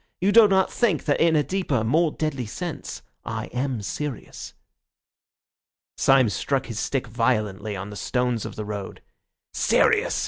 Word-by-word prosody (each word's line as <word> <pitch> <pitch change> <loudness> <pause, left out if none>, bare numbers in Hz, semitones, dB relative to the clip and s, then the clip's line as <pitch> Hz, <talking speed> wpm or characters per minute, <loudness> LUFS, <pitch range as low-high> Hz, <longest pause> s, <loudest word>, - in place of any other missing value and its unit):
You 195 +3 +2
do 225 0 +8
not 190 -1 +2
think 215 -10 +1
that 145 - +1
in 165 -1 +4
a 150 - +3
deeper, 185 -6 -2
a 110 - +1
more 155 +8 +2
deadly 140 -7 -3
sense, 175 - -6 0.2
I 110 0 -4
am 125 -3 -2
serious." 120 +8 -6 1.4
Syme 135 -4 +4
struck 135 +7 -1
his 115 -3 -5
stick 135 -2 -1
violently 110 -4 -1
on 95 +2 -6
the - - -8
stones 125 +2 -1
of - - -7
the 105 - -5
road. 105 -2 -6 0.5
"Serious!" - - +2
125 Hz, 160 wpm, -24 LUFS, 110-155 Hz, 1.4 s, do